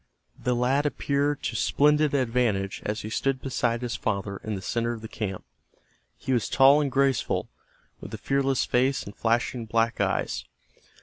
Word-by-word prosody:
The 125 - +1
lad 135 +4 +2
appeared 145 0 -1
to - - -2
splendid 150 0 +3
advantage 115 -7 0
as 105 +1 -2
he 110 - -6
stood 135 +2 0
beside 120 -3 -1
his 120 0 -2
father 100 -1 -2
in 110 +1 -5
the 95 - -6
center 115 0 -1
of 115 - -8
the - - -5
camp. 100 -4 -5 0.7
He 130 - -2
was 120 -4 0
tall 140 +2 +6
and 140 -2 -1
graceful, 135 -2 +1 0.5
with - - -9
a - - -5
fearless 135 -1 +1
face 130 +2 +1
and 100 - -10
flashing 115 0 0
black 115 +1 +1
eyes. - - -1
125 Hz, 170 wpm, -26 LUFS, 115-135 Hz, 0.7 s, tall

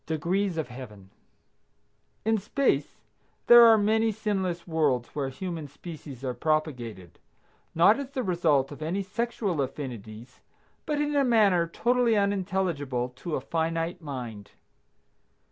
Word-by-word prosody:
DEGREES 175 +4 -1
OF 160 - -2
HEAVEN. 105 -6 -11 1.1
In 220 0 +2
space 265 +8 0 0.5
there 240 -1 +9
are 225 -1 +7
many 220 +2 +2
sinless 195 -5 -2
worlds 145 -7 +1
where 140 -2 -3
human 165 +2 -5
species 140 -2 -10
are 130 -2 -2
propagated, 120 - -2 0.6
not 200 +9 +5
as 275 -2 -5
the 265 -2 -3
result 165 - +1
of 145 - -10
any 175 +6 -2
sexual 200 -5 -2
affinities, 120 -4 -7 0.5
but 300 -2 0
in 295 0 0
a 280 - +4
manner 205 -9 +3
totally 235 +4 +2
unintelligible 185 -11 -1
to 150 +6 -5
a - - -2
finite 165 +4 -2
mind. 120 -9 -7
165 Hz, 130 wpm, -27 LUFS, 135-205 Hz, 1.1 s, there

